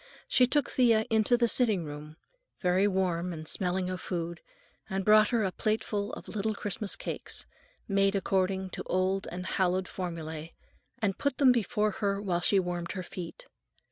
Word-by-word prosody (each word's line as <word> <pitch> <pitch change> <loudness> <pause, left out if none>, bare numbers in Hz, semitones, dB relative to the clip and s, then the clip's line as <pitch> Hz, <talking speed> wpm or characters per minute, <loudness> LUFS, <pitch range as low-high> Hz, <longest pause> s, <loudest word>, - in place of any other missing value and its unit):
She 250 - +4
took 290 +1 +2
Thea 230 -4 +4
into 220 +2 +4
the 235 -1 +3
sitting 220 -7 +2
room, 150 +1 -8 0.4
very 185 +2 +3
warm 180 -2 0
and 155 -2 -7
smelling 180 +1 0
of 185 0 -4
food, 170 -1 -4 0.5
and 190 -1 -2
brought 215 0 +6
her 230 -3 +2
a 190 - 0
plateful 215 0 -1
of - - -8
little 215 0 -2
Christmas 205 0 -3
cakes, - - -5 0.4
made 195 -1 +2
according 190 -1 0
to - - -5
old 185 +1 0
and 180 +1 -5
hallowed 185 0 +1
formulae, 165 -3 -5 0.4
and 200 -3 -1
put 280 -2 0
them 270 -3 +6
before 215 -2 +1
her 200 -1 +1
while 180 -4 -1
she 195 +2 +4
warmed 175 -2 -3
her 185 -2 -4
feet. 170 -1 -8
190 Hz, 170 wpm, -29 LUFS, 180-215 Hz, 0.5 s, brought